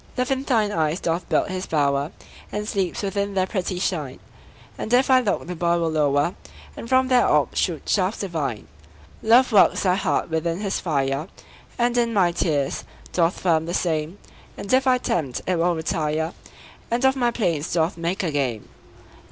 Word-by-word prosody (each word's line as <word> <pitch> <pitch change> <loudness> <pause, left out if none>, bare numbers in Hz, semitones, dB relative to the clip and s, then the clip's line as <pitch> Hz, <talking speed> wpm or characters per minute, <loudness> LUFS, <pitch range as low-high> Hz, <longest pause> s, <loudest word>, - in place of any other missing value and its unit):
Love 250 +1 0
in 265 0 +1
thine 225 -6 +1
eyes 160 -1 0
doth 170 +1 -2
build - - +2
his 185 0 -4
bower, 140 -1 +1 0.4
And 210 0 -3
sleeps 195 -3 -2
within 200 0 -2
their 185 -1 +2
pretty 185 -2 -3
shine; 160 -8 -2 0.6
And 220 - -5
if 260 +2 +4
I 260 - +7
look, 220 -5 -1
the 180 +1 -5
boy 170 +1 +1
will 165 -1 0
lower, 150 +1 +1 0.4
And 230 - -8
from 260 0 +4
their 250 -1 +4
orbs 150 -1 +2
shoot 165 -4 -1
shafts 195 +1 +1
divine. 150 - -3 0.5
Love 245 +3 +5
works 205 - +4
thy 185 -2 +3
heart 190 -3 -1
within 165 +2 -1
his 200 -2 -1
fire, 140 -1 -1 0.5
And 240 0 +1
in 230 -1 0
my 180 -3 +4
tears 150 -5 -1 0.3
doth 170 0 +1
firm 165 -3 +2
the 175 - -2
same; 160 +1 -1 0.4
And 200 - -4
if 265 +1 +3
I 255 -1 +5
tempt, 155 - -2
it 180 -1 0
will 175 +1 +2
retire, 160 0 -1 0.6
And 240 +3 0
of 265 0 +4
my 245 -2 +2
plaints 170 -10 -1
doth 165 +1 +1
make 170 +3 -2
a 170 - -1
game. 130 -7 -2
180 Hz, 185 wpm, -23 LUFS, 160-210 Hz, 0.6 s, I